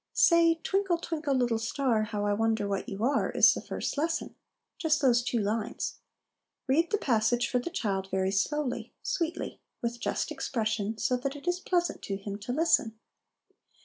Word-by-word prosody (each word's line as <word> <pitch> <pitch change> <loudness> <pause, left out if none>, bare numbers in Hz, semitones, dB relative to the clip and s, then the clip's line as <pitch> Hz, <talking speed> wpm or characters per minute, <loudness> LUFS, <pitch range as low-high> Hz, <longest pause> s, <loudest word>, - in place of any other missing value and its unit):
Say 335 -9 +5
" 325 - -28
Twinkle, 385 -3 +1
twinkle, 315 -4 -2
little 240 -3 +1
star, 230 -1 0
How 210 -1 -3
I 205 - +2
wonder 220 -1 +1
what 200 -1 -2
you 200 +2 -4
are," 275 +2 +2
is - - +6
the - - -5
first - - -3
lesson; 325 +1 -1 0.5
just 315 -3 +2
those 245 -4 +4
two 245 0 -1
lines. 215 +1 -2 0.7
Read 320 +6 +2
the 420 - +2
passage 240 - +2
for 250 - +1
the 245 - -4
child, 195 - -2
very 190 0 0
slowly, 265 +7 -1
sweetly, 335 -1 -2 0.2
with 235 0 -3
just - - -2
expression, 220 -3 -2
so 250 +2 +1
that 270 +3 -3
it 290 +4 -11
is 355 0 +1
pleasant 355 -2 0
to 195 - -3
him 200 +1 -6
to 215 +4 -5
listen. 255 -6 +2
245 Hz, 180 wpm, -29 LUFS, 215-320 Hz, 0.7 s, is